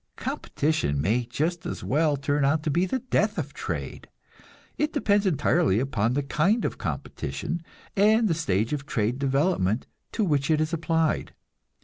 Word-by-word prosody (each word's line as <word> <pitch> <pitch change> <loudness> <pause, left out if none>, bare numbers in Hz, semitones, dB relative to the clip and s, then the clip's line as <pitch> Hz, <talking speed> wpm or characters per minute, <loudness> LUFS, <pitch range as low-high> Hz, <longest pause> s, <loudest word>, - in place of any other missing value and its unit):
Competition 150 - -1
may 110 - +1
just 160 +8 -2
as - - -5
well 150 0 +2
turn 145 +1 0
out 150 +3 +2
to 155 - 0
be 175 +5 +2
the 260 - 0
death 220 -3 0
of - - -3
trade; - - -5 0.7
it 300 +1 0
depends 205 -8 +2
entirely 155 - +2
upon 120 -2 0
the 145 - +1
kind 175 - +1
of - - -3
competition, 170 - -4 0.3
and 215 +3 +4
the 175 - +2
stage 115 - 0
of 145 -1 -4
trade 115 +2 0
development 135 - +1 0.3
to 220 - +1
which 145 -6 +1
it 155 -1 +3
is 155 +2 -1
applied. 165 -1 0
155 Hz, 160 wpm, -26 LUFS, 135-175 Hz, 0.7 s, and